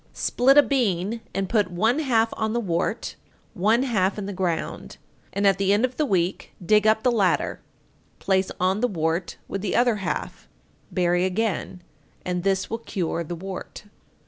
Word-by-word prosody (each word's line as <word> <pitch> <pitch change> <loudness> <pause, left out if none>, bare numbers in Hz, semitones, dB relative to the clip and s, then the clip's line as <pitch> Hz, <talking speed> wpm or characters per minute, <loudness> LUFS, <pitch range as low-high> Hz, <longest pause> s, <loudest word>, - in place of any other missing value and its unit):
884. - - -12
Split 270 +3 +3
a 290 - +9
bean 225 -4 0
and 195 -1 -2
put 205 -2 +1
one 220 - +1
half 230 -7 +2
on 220 0 -1
the 240 - +1
wart, 175 -7 -2 0.4
one 220 +7 +2
half 205 -7 +1
in 205 - -4
the 200 - -5
ground, 180 -3 -3 0.3
and 200 +1 -1
at 195 -1 +4
the 195 0 +2
end 210 +5 +3
of 255 0 -6
the 305 - +1
week 185 -3 -1
dig 210 +2 +4
up 220 0 +3
the 250 - +3
latter; 200 -6 +1 0.6
place 190 -1 +1
on 185 +2 +1
the 245 - +3
wart 165 -2 -2
with 195 - -4
the 200 - -2
other 240 -3 +3
half; 190 -3 -4 0.4
bury 175 -1 +1
again, 185 -2 -2 0.4
and 180 -1 -1
this 190 0 0
will 230 - -4
cure 175 -6 -3
the 175 +2 -5
wart. 190 +2 -7
195 Hz, 180 wpm, -24 LUFS, 180-225 Hz, 0.6 s, a